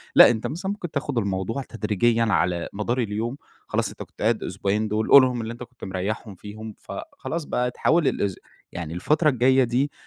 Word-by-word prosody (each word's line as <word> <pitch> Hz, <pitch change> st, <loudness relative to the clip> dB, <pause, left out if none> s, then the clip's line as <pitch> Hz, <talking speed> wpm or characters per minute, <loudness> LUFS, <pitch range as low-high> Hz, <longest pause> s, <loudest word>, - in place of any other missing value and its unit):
لأ، -, -, +10 dB
أنت 115 Hz, -2 st, -1 dB
مثلًا 185 Hz, +5 st, -3 dB
ممكن 185 Hz, -5 st, -5 dB
تاخد 140 Hz, -2 st, -2 dB
الموضوع 100 Hz, +3 st, -1 dB
تدريجيًا 115 Hz, 0 st, +1 dB
على 90 Hz, -5 st, +1 dB
مدار 115 Hz, +5 st, -1 dB
اليوم، 115 Hz, +3 st, -2 dB, 0.3 s
خلاص -, -, 0 dB
أنت -, -, -8 dB
كنت -, -, -16 dB
قاعد 110 Hz, +1 st, +1 dB
أسبوعين 100 Hz, +3 st, -1 dB
دول، 110 Hz, +1 st, -1 dB
قُلهم 130 Hz, -3 st, +7 dB
اللي 115 Hz, +1 st, -4 dB
أنت 120 Hz, -, -8 dB
كنت 125 Hz, 0 st, -16 dB
مريحهم 100 Hz, +2 st, -4 dB
فيهم، 105 Hz, +3 st, -9 dB
فخلاص 285 Hz, -, -6 dB
بقى 125 Hz, -2 st, -1 dB
تحاول 160 Hz, +4 st, +2 dB
الأس 100 Hz, -3 st, 0 dB, 0.4 s
يعني 85 Hz, -2 st, -5 dB
الفترة 150 Hz, -, +2 dB
الجاية 130 Hz, 0 st, +4 dB
دي، 125 Hz, +4 st, 0 dB
115 Hz, 180 wpm, -24 LUFS, 105-130 Hz, 0.4 s, لأ